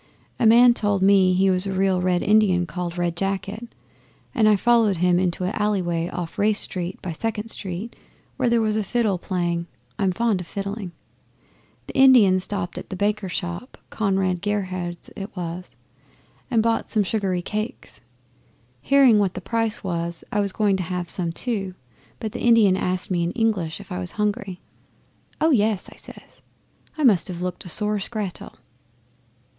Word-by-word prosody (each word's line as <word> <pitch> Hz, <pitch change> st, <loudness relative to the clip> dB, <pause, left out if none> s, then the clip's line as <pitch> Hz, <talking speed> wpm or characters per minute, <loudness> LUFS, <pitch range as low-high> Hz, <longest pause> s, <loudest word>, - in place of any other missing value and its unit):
A 225 Hz, -, +4 dB
man 240 Hz, +2 st, +7 dB
told 205 Hz, -4 st, 0 dB
me 190 Hz, -2 st, +5 dB
he 190 Hz, +1 st, +3 dB
was 185 Hz, +1 st, 0 dB
a -, -, -2 dB
real 190 Hz, -1 st, +1 dB
Red 180 Hz, -1 st, +1 dB
Indian 200 Hz, -4 st, +3 dB
called 175 Hz, +1 st, -5 dB
Red 175 Hz, -1 st, -1 dB
Jacket, 195 Hz, +5 st, -3 dB, 0.6 s
and 220 Hz, -5 st, +4 dB
I 210 Hz, -, +5 dB
followed 225 Hz, -2 st, +3 dB
him 180 Hz, +1 st, +3 dB
into 180 Hz, -1 st, -1 dB
an 185 Hz, +3 st, -1 dB
alley 210 Hz, -2 st, 0 dB
way 170 Hz, 0 st, -1 dB
off 175 Hz, -2 st, -6 dB
Race 210 Hz, 0 st, +2 dB
Street 180 Hz, 0 st, -4 dB
by 180 Hz, -, -3 dB
Second 215 Hz, +5 st, -3 dB
Street, 195 Hz, +2 st, -5 dB, 0.4 s
where 245 Hz, -, +1 dB
there 235 Hz, -1 st, +3 dB
was 215 Hz, -1 st, 0 dB
a 215 Hz, -, 0 dB
fiddle 210 Hz, -3 st, 0 dB
playing. 175 Hz, -2 st, -2 dB, 0.3 s
I'm 195 Hz, -2 st, +2 dB
fond 220 Hz, -1 st, 0 dB
o' -, -, -5 dB
fiddling. 200 Hz, +1 st, -5 dB, 0.9 s
The -, -, -9 dB
Indian 240 Hz, -9 st, +6 dB
stopped 185 Hz, -1 st, -4 dB
at -, -, -11 dB
a -, -, -3 dB
baker's 205 Hz, -1 st, -1 dB
shop 175 Hz, +9 st, -5 dB
Conrad 190 Hz, -4 st, 0 dB
Gerhard's 185 Hz, -4 st, -3 dB
it 200 Hz, +1 st, -7 dB
was 175 Hz, +1 st, -6 dB, 0.7 s
and 230 Hz, -4 st, +2 dB
bought 230 Hz, 0 st, 0 dB
some 215 Hz, -2 st, +2 dB
sugary 190 Hz, -3 st, -1 dB
cakes. 215 Hz, +4 st, -5 dB, 0.8 s
Hearing 260 Hz, -, +5 dB
what 195 Hz, -3 st, 0 dB
the -, -, -3 dB
price 225 Hz, +3 st, -2 dB
was 170 Hz, -2 st, -3 dB
I 210 Hz, -, 0 dB
was 200 Hz, -1 st, +2 dB
going 200 Hz, -1 st, +1 dB
to -, -, -3 dB
have 180 Hz, -1 st, -3 dB
some 170 Hz, -3 st, -2 dB
too, 195 Hz, -2 st, -3 dB, 0.4 s
but 220 Hz, -, -4 dB
the 240 Hz, -, -6 dB
Indian 225 Hz, -5 st, +5 dB
asked 185 Hz, 0 st, -2 dB
me 175 Hz, -2 st, +1 dB
in 170 Hz, -, -2 dB
English 210 Hz, -9 st, -1 dB
if -, -, -13 dB
I 90 Hz, -, -3 dB
was 90 Hz, -, -5 dB
hungry. 200 Hz, -3 st, -2 dB, 0.8 s
"Oh 320 Hz, +1 st, +3 dB
yes!" 215 Hz, -6 st, +1 dB
I -, -, -20 dB
says. -, -, -14 dB, 0.6 s
I 310 Hz, -, -1 dB
must 210 Hz, -10 st, +4 dB
have 180 Hz, -2 st, -5 dB
looked 180 Hz, 0 st, -4 dB
a -, -, -7 dB
sore 210 Hz, +4 st, 0 dB
scrattel. 200 Hz, -2 st, -5 dB
195 Hz, 175 wpm, -23 LUFS, 180-215 Hz, 0.9 s, man